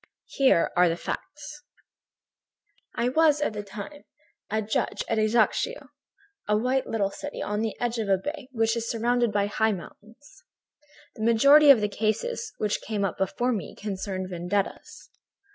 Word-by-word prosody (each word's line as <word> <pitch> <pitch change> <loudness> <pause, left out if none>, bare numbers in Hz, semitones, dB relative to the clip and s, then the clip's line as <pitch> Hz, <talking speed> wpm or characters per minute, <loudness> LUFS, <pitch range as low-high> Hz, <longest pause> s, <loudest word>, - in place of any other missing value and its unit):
Here 265 -11 +3
are 175 0 +5
the 165 - -2
facts: 300 +9 -7 1.3
"I 240 - +1
was, 305 +1 +3
at 295 - -1
that 210 -1 -6
time, 210 +9 -9 0.4
a 220 - 0
judge 220 0 -2
at 225 -2 0
Ajaccio, 225 - +1 0.6
a 210 - +2
little 225 -3 0
white - - -15
city 290 - -7
on 210 +1 -2
the 220 -1 -3
edge 240 -1 -1
of 215 -3 -2
a 195 - +4
bay 285 +5 -6
which 225 -2 +1
is 230 0 -3
surrounded 240 0 +1
by 205 -1 +1
high 220 +1 +1
mountains. 225 - -13 0.7
"The 220 - -6
majority 280 +7 +6
of 260 -6 +8
the 210 - +1
cases 225 - -2
which 210 -1 -1
came 205 -2 -2
up 185 - -4
before 240 +6 0
me 200 -10 -4
concerned 190 -2 -4
vendettas. 180 +3 -4
220 Hz, 160 wpm, -26 LUFS, 205-255 Hz, 1.3 s, of